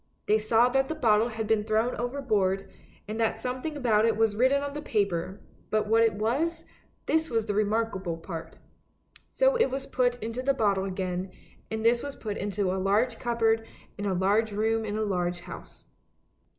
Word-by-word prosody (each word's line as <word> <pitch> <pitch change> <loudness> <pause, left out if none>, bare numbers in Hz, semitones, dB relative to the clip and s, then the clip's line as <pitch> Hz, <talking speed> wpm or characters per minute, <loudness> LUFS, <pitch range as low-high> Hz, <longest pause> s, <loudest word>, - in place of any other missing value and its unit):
They 215 +1 +3
saw 225 +3 +4
that 270 +1 +2
the 320 - -2
bottle 225 -6 +3
had 220 -1 -4
been 215 -1 +2
thrown 220 +3 +1
overboard, 220 -7 0 0.4
and 215 +2 -4
that 225 -1 +1
something 255 +5 -4
about 225 -6 +3
it 225 -1 +2
was 220 -2 +2
written 260 +5 +3
on 285 0 -4
the 295 - -5
paper, 195 - -1 0.3
but 215 -1 +1
what 225 +2 +3
it 225 -1 +4
was, 275 +11 -1 0.4
this 320 0 +1
was 225 -2 0
the 210 - -2
remarkable 205 -4 0
part. 165 -1 -8 0.7
So - - +3
it 460 - +3
was 270 +1 -4
put 245 -1 +1
into 230 +2 -4
the 275 +1 +1
bottle 200 -5 +1
again, 185 -1 -3 0.4
and 220 0 -3
this 235 +1 +4
was 285 -1 -6
put 210 -2 -5
into 200 -2 -1
a 190 - -2
large 220 +5 +1
cupboard 225 -2 +1 0.3
in 205 0 -3
a 190 - 0
large 205 +4 +2
room 220 +2 0
in 210 0 -3
a 220 - 0
large 175 -3 -1
house. - - -11
220 Hz, 190 wpm, -28 LUFS, 205-245 Hz, 0.7 s, saw